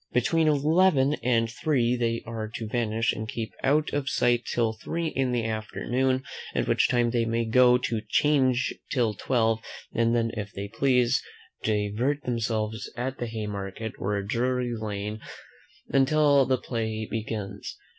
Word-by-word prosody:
Between 155 +6 +2
eleven 150 -1 +4
and 115 -1 +2
three 125 0 +1
they 115 -1 -1
are 115 -1 -4
to 110 - -4
vanish, 115 0 0
and 110 0 -5
keep 110 -1 -4
out 150 +3 +2
of 145 -1 -1
sight 120 -1 +2
till 115 -2 +1
three 165 +9 -3
in 130 -3 0
the 120 -2 0
afternoon, 125 +4 -1 0.3
at - - 0
which - - +3
time 120 -1 +2
they 120 -1 +1
may 115 0 0
go 125 +2 +5
to 115 -3 -2
'Change 130 -3 +2 0.2
till 120 -5 +1
five; 115 +1 +1 0.4
and 115 0 +2
then, 115 -1 +1
if 105 -2 -5
they 100 +1 -5
please, 125 +1 +2 0.4
divert 110 +7 0
themselves 110 -2 -2
at 130 +2 -3
the 120 - -2
Haymarket, 105 -1 -5
or 100 +1 -1
Drury 125 +3 0
Lane 105 -1 -4 0.7
until 140 0 +4
the 130 0 +2
play 110 -3 -3
begins. 110 -2 -5
120 Hz, 150 wpm, -27 LUFS, 110-130 Hz, 0.7 s, go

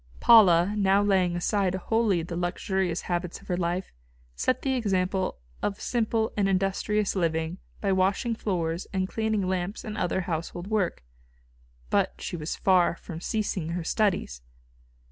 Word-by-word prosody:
Paula 195 -5 +6
now 200 0 +3
laying 185 -3 +2
aside 190 +1 0
wholly 200 -2 +1
the 170 +1 -6
luxurious 175 0 -1
habits 175 0 -3
of - - -18
her 180 - +1
life, 175 +1 -2 0.4
set 255 - 0
the 270 - +1
example 190 -5 0 0.2
of 200 -1 -2
simple 225 -2 0
and 200 -2 +1
industrious 195 +2 0
living 165 0 -1 0.2
by 200 - +1
washing 195 +5 +1
floors 175 -5 -2
and 190 -1 -1
cleaning 220 -2 -1
lamps 185 +3 -2
and 215 -2 -5
other 185 -2 0
household 175 0 -4
work. 200 - -1 0.9
But - - +2
she - - -5
was 155 -1 -4
far 185 -3 +3
from 170 -1 -9
ceasing 185 -6 -2
her 175 -1 -2
studies. 180 - 0
190 Hz, 145 wpm, -27 LUFS, 175-205 Hz, 0.9 s, Paula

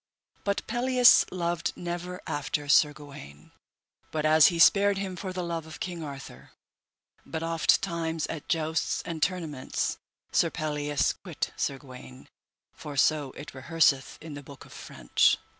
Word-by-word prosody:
But 200 0 -1
Pelleas 250 +1 +5
loved 170 -2 -2
never 175 +1 -5
after 145 0 -3
Sir 150 +1 +5
Gawaine, 140 - -13 0.6
but 155 -1 -2
as 155 0 +7
he 175 - 0
spared 200 +4 +5
him 195 -2 -4
for 185 +1 -5
the 185 -1 -4
love 165 -2 -4
of 160 - -10
King 175 -2 -5
Arthur; 140 -2 -10 0.7
but 160 0 -5
ofttimes 165 0 +1
at 160 -3 -7
jousts 160 -1 0
and 165 -2 -6
tournaments 160 -8 -2 0.3
Sir - - +3
Pelleas 150 -2 -1
quit - - -4
Sir 135 - -2
Gawaine, 125 - -13 0.5
for 145 -2 -8
so 150 0 +2
it 145 - -10
rehearseth 135 0 +1
in 155 -1 -8
the 145 - -7
book 140 -1 -13
of - - -15
French. - - +1
160 Hz, 145 wpm, -28 LUFS, 145-175 Hz, 0.7 s, as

